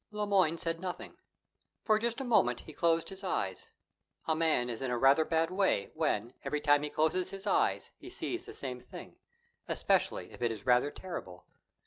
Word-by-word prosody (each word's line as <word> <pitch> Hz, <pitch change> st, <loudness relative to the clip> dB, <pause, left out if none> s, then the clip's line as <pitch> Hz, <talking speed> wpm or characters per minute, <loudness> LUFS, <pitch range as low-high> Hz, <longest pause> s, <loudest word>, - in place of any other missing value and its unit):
Le 210 Hz, 0 st, -2 dB
Moyne 185 Hz, -5 st, +3 dB
said 165 Hz, -1 st, -2 dB
nothing. 180 Hz, -1 st, -5 dB, 0.7 s
For 215 Hz, -1 st, +3 dB
just 235 Hz, +2 st, -1 dB
a -, -, -2 dB
moment 170 Hz, -, +3 dB
he 155 Hz, -, -12 dB
closed 165 Hz, +1 st, +1 dB
his 195 Hz, 0 st, -8 dB
eyes. 100 Hz, -, -2 dB, 0.6 s
A 160 Hz, -, +1 dB
man 155 Hz, -6 st, +2 dB
is 120 Hz, -1 st, -5 dB
in 130 Hz, -, -2 dB
a 125 Hz, -, 0 dB
rather 135 Hz, +5 st, +5 dB
a -, -, +1 dB
bad 165 Hz, +1 st, +1 dB
way 185 Hz, -, +1 dB
when, 125 Hz, -7 st, -1 dB
every 150 Hz, +2 st, -1 dB
time 145 Hz, -1 st, +4 dB
he 150 Hz, -, -3 dB
closes 160 Hz, +5 st, +1 dB
his 195 Hz, +1 st, -7 dB
eyes, -, -, +1 dB
he -, -, -11 dB
sees 355 Hz, -, -4 dB
the -, -, -8 dB
same 125 Hz, -2 st, -5 dB
thing, -, -, -11 dB, 0.5 s
especially -, -, +1 dB
if -, -, -13 dB
it 120 Hz, -1 st, +1 dB
is 105 Hz, -2 st, -7 dB
rather 125 Hz, +3 st, +4 dB
terrible. 145 Hz, -, -8 dB
160 Hz, 195 wpm, -32 LUFS, 125-185 Hz, 0.7 s, rather